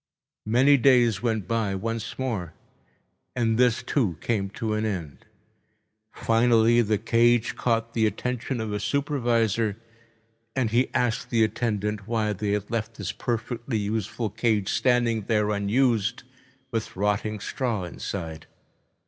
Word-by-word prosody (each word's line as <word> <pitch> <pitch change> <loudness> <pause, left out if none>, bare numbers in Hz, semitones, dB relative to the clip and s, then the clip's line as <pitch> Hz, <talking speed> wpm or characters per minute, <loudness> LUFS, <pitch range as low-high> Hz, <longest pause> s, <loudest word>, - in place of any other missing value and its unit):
Many 130 +6 +5
days 125 -4 +4
went 110 -5 -1
by 110 -3 0
once 115 +3 -4
more, 110 -11 -3 0.8
and 115 -2 +1
this, 125 -2 +3
too, 105 - 0
came 100 -2 -1
to 110 +1 -3
an 105 0 -1
end. 90 -9 -4 0.8
Finally 115 0 +3
the 110 -2 +1
cage 115 +2 +2
caught 115 -1 0
the 110 -2 +3
attention 125 +4 -3
of 110 -2 -3
a 105 - -1
supervisor, 115 -6 0 0.8
and 125 -5 0
he 120 +3 +2
asked 120 -2 0
the 115 -2 +3
attendant 105 -2 -1
why 110 -2 0
they 105 +1 -2
had 105 +1 -3
left 115 0 -2
this 100 -4 -4
perfectly 120 0 -3
useful 105 +1 -2
cage 105 -2 0
standing 120 -3 +2
here 105 -2 +2
unused 115 +2 +1 0.5
with 115 -2 -3
rotting 105 +2 -1
straw 115 -2 -2
inside. 85 -2 -6
115 Hz, 130 wpm, -25 LUFS, 105-120 Hz, 0.8 s, Many